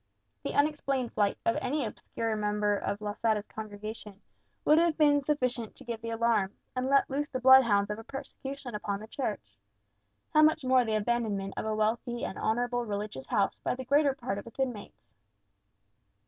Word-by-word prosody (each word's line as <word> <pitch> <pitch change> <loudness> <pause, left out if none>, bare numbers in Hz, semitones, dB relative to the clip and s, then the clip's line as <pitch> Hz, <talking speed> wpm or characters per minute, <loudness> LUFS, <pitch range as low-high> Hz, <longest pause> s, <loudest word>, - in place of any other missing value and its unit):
The - - -4
unexplained 275 -4 +1
flight 205 -1 +1
of 230 - +2
any 285 0 -1
obscure 225 +1 -3
member 210 -1 +1
of 200 +1 -3
Losada's 210 0 0
congregation 215 -1 -8 0.5
would 305 +1 +6
have 335 -2 +2
been 290 -2 +5
sufficient 255 -5 -1
to - - -10
give 235 -3 -5
the 230 - -5
alarm, 225 -4 +1 0.2
and 255 +1 -1
let 275 0 +4
loose 290 +2 -2
the 255 - -3
bloodhounds 235 -6 +6
of 210 - -4
persecution 270 -1 -7
upon 205 -1 -3
the 215 - -8
Church; 205 - -5 0.7
how 305 - +6
much 310 -2 +4
more 255 -1 +5
the 220 -2 -1
abandonment 210 -3 -1
of - - -3
a 215 - 0
wealthy 235 +2 -1
and - - -5
honourable 245 +2 0
religious 205 - -5
house 200 - +1
by - - -1
the 260 0 -7
greater 280 +1 +3
part 240 -6 -3
of 200 - -11
its 230 - -13
inmates? 245 -6 -4
230 Hz, 175 wpm, -30 LUFS, 210-265 Hz, 0.7 s, would